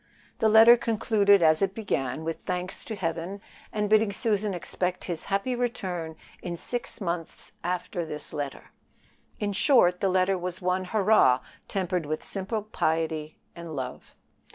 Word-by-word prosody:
The 220 - +4
letter 225 +2 +8
concluded 205 -4 +3
as 155 -1 +5
it 195 0 +1
began, 145 - -2
with 165 0 -3
thanks 180 0 -3
to 220 - -4
Heaven, 170 +1 -3 0.3
and 210 -1 -1
bidding 215 0 +4
Susan 210 0 0
expect 180 +1 -3
his 170 -3 -5
happy 200 +6 0
return 180 -9 -3 0.3
in 175 -1 -4
six 245 +7 -5
months 170 -4 -4
after 175 0 -2
this 150 -2 -8
letter. 145 -3 -5 0.7
In 205 -1 -1
short, 195 -6 +4
the 195 - +1
letter 185 0 +2
was 180 +1 -4
one 185 0 0
"Hurrah!" 195 - +4 0.3
tempered 180 -4 -1
with 155 +1 -3
simple 200 +2 -3
piety 160 -6 -1 0.2
and 170 -2 -7
love. 130 -2 -6
185 Hz, 150 wpm, -27 LUFS, 165-210 Hz, 0.7 s, letter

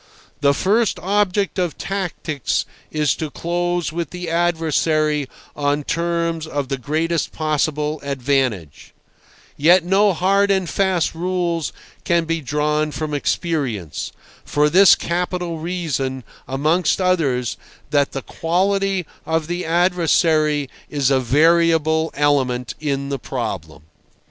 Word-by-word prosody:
The 140 -1 +3
first 215 +7 +2
object 200 0 0
of 175 -3 -1
tactics 175 - -2 0.2
is 150 -1 +1
to 155 - -3
close 175 +1 -2
with 170 -3 -3
the 180 -2 -5
adversary 160 -4 +1 0.3
on 145 0 0
terms 170 0 -1
of 145 -3 -3
the 135 -2 -2
greatest 160 +4 -1
possible 150 0 -1
advantage; 130 - -2 0.6
yet 175 +5 +5
no 195 +3 +4
hard 195 +4 +2
and 190 -2 +1
fast 185 -2 +1
rules 170 -1 -1 0.3
can 170 -2 +2
be 165 0 -1
drawn 150 +2 0
from 150 0 -4
experience, 135 - -2 0.3
for 150 0 +1
this 190 +3 +7
capital 175 -1 -2
reason, 150 -7 -3 0.2
amongst 155 +10 +1
others—that 145 -4 0
the 135 - -5
quality 195 +2 0 0.2
of 160 -1 0
the 175 +2 -3
adversary 165 -4 +2 0.2
is 140 -2 +1
a 135 - +4
variable 160 +4 +3
element 135 -4 +1
in 140 -2 -2
the 140 -1 -2
problem. 80 - -5
160 Hz, 115 wpm, -20 LUFS, 145-175 Hz, 0.6 s, this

